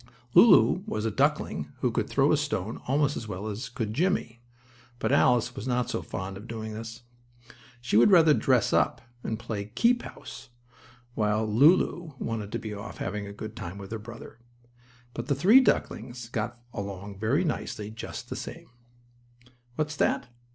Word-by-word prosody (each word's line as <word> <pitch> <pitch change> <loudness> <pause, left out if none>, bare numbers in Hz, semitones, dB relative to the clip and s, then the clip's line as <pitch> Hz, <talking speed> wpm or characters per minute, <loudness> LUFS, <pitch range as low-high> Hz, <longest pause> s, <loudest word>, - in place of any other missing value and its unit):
Lulu 205 -4 +7
was 110 - -2
a 110 - 0
duckling - - 0
who - - +2
could - - -1
throw - - +3
a - - +5
stone 105 +5 -2
almost 145 +2 +2
as 115 - -5
well 100 0 -5
as 110 +2 -4
could 115 -3 -3
Jimmie, 130 - 0 0.6
but - - -1
Alice 125 0 +3
was 130 - -6
not 125 -1 0
so - - -2
fond 95 +1 -6
of 105 +4 -11
doing 110 -2 -5
this. 115 +2 -8 0.8
She 120 -3 +1
would 120 - +7
rather 165 -5 +7
dress 125 -6 +2
up, - - +2 0.2
and 110 - -2
play 110 -3 -4
keep 235 - +2
house, - - -10 0.6
while 105 0 +1
Lulu 155 - +3
wanted 110 -4 -4
to - - 0
be 110 -1 -6
off 100 +3 -8
having 100 +1 -4
a - - -7
good 110 +2 -8
time 90 +3 -7
with 100 0 -9
her 110 - -3
brother. 115 +2 -11 0.7
But - - -5
the 140 - +1
three 195 - +7
ducklings 120 - -1
got 115 +1 -3
along 100 -1 -6
very 125 - +2
nicely 110 - -3
together 110 - -15
just - - -7
the - - -2
same. - - -8 1.0
What's 155 0 -2
that? 125 - +1
115 Hz, 175 wpm, -27 LUFS, 105-135 Hz, 1.0 s, Lulu